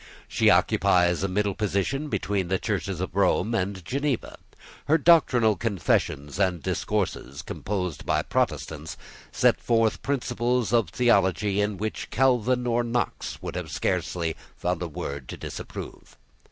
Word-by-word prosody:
She - - +3
occupies 90 -1 +3
a 95 - +1
middle 100 +1 0
position 105 +9 -1
between 100 -8 -1
the 95 +1 +1
Churches 100 -3 -2
of 95 -2 -4
Rome 100 +2 +2
and 95 -3 -2
Geneva. 140 -1 -2 0.5
Her 155 - +4
doctrinal 130 -9 +5
confessions 90 -8 -1
and 90 -6 +1
discourses, 70 +2 -2
composed 90 -3 -4
by - - +1
Protestants, 80 0 -2 0.3
set - - +3
forth 115 -2 +2
principles 125 -3 0
of 115 -7 +3
theology 100 -2 +2
in 105 -1 -1
which 110 +3 -4
Calvin 125 -1 +2
or 120 0 +1
Knox 120 +1 -3
would - - -4
have - - -4
found - - -6
scarcely 85 -1 -1 0.3
a 90 +1 +1
word 70 -4 -6
to - - -6
disapprove. - - -8
100 Hz, 140 wpm, -26 LUFS, 90-120 Hz, 0.5 s, doctrinal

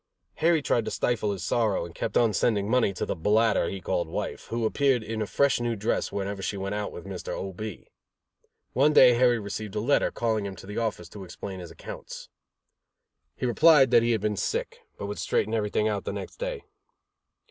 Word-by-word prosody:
Harry 165 -2 +3
tried 120 - +1
to - - -3
stifle 110 -4 0
his 95 -4 -5
sorrow 110 -6 +1
and 85 - -10
kept - - -2
on 115 -3 +3
sending 100 0 +1
money 120 -3 +3
to 95 - -3
the - - -2
bladder 105 +1 +2
he 95 - -5
called 85 -1 -1
wife, - - -5
who 115 0 -2
appeared 130 0 +2
in 110 0 -4
a 105 - -1
fresh 140 +3 +2
new 120 -1 -1
dress 105 +1 -1
whenever 100 0 -3
she 100 - -3
went 100 +1 -3
out 105 0 -3
with - - -9
Mr. - - -7
O. 95 0 -4
B. 105 -1 -7 0.9
One 145 +4 +4
day 125 -4 +8
Harry 120 0 +4
received 105 0 -5
a - - 0
letter, 130 +7 +2
calling 110 -3 -1
him 100 -1 -5
to 90 - -12
the 105 +3 -4
office 105 -7 -2
to 100 0 -9
explain 95 +1 -7
his 90 -2 -8
accounts. - - -9 1.1
He - - -3
replied 135 +1 +5
that 120 -1 +6
he 120 - +1
had 110 - -1
been 105 -1 -1
sick, - - -2 0.2
but - - -5
would 105 +1 -5
straighten 110 - 0
everything 105 -1 +1
out 105 -2 -1
the - - -4
next - - -7
day. - - -4
110 Hz, 215 wpm, -27 LUFS, 100-120 Hz, 1.1 s, day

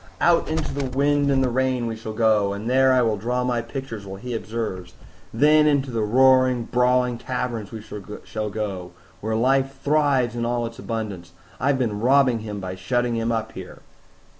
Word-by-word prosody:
"Out 170 -1 +3
into 160 -1 -2
the 140 -2 -2
wind 140 +2 +2
and 135 -1 +3
the 130 - +1
rain 130 0 0
we 115 -1 -3
shall 110 0 -7
go, 110 -3 +2
and 100 +3 -6
there 130 +1 +4
I 130 -1 +4
will 110 -2 +1
draw 125 +4 -1
my 125 -1 0
pictures 115 -3 -7
while 95 0 -8
he 125 +2 -6
observes; 110 -6 -5 0.4
then 150 +5 +4
into 140 -3 +1
the 115 -2 -1
roaring, 130 +2 +4
brawling 125 0 +1
taverns 120 -5 -4
we 110 -2 -8
shall 105 +1 -6
go, 100 -4 -4 0.3
where 110 +1 -2
life 135 +3 +1
thrives 140 -5 +2
in 120 - -2
all 120 0 -1
its 115 0 -8
abundance. 100 -7 -5 0.3
I've 140 +1 +2
been 110 -5 -1
robbing 130 0 +3
him 105 -2 -6
by 95 -1 -5
shutting 120 +6 -1
him 115 0 -1
up 115 -1 -2
here." - - -10
120 Hz, 190 wpm, -23 LUFS, 110-130 Hz, 0.4 s, there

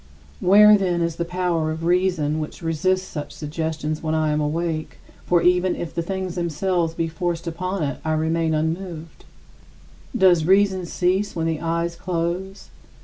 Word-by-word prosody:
Where, 210 +2 +7
then, 175 -3 0
is 170 -1 -2
the 170 - -1
power 175 -2 -1
of 160 +1 -4
reason 175 -4 +1
which 155 +2 -6
resists 185 +4 0
such 150 -2 -6
suggestions 155 0 -4
when 160 0 -1
I 155 -1 +1
am 150 0 0
awake 155 +1 -2 0.3
for 175 -1 +3
even 180 +1 +3
if 170 - -6
the 170 - -1
things 190 +1 -3
themselves 170 0 -1
be 165 - -1
forced 170 +1 -3
upon 185 +2 -3
it 140 - -3
I 155 - 0
remain 160 0 0
unmoved? 165 +1 -4 0.9
Does 180 -6 +5
reason 190 -1 +3
cease 190 +4 0
when 165 -1 -1
the 160 -2 -1
eyes 170 0 -1
close? 180 +2 -3
170 Hz, 160 wpm, -22 LUFS, 160-185 Hz, 0.9 s, Where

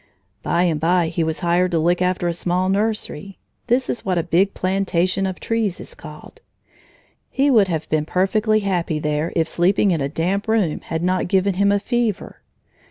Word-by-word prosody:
By 170 +1 +1
and 165 -4 +1
by 170 +1 +2
he 165 0 -1
was 160 0 -2
hired 175 +1 +2
to - - +2
look 175 +3 +1
after 180 -1 0
a 170 - 0
small 180 +2 -1
nursery 200 -3 -2 0.3
(this 250 +2 +1
is 235 - -3
what 185 -2 -1
a 170 - +1
big 175 +4 +1
plantation 185 0 0
of 185 - -5
trees 225 -5 -1
is - - -9
called). 155 - -12 0.9
He 275 +1 +2
would 215 -6 +5
have 160 -3 -3
been 155 -1 0
perfectly 215 +5 +1
happy 175 -5 -1
there 150 +1 -1
if 165 -1 +1
sleeping 190 +4 +2
in 165 -4 0
a 135 - -1
damp 180 +7 -1
room 215 -8 +1
had 165 0 -4
not 185 +1 0
given 190 +1 +2
him 200 +2 +2
a 205 - +3
fever. 225 -2 -2
185 Hz, 190 wpm, -21 LUFS, 170-200 Hz, 0.9 s, would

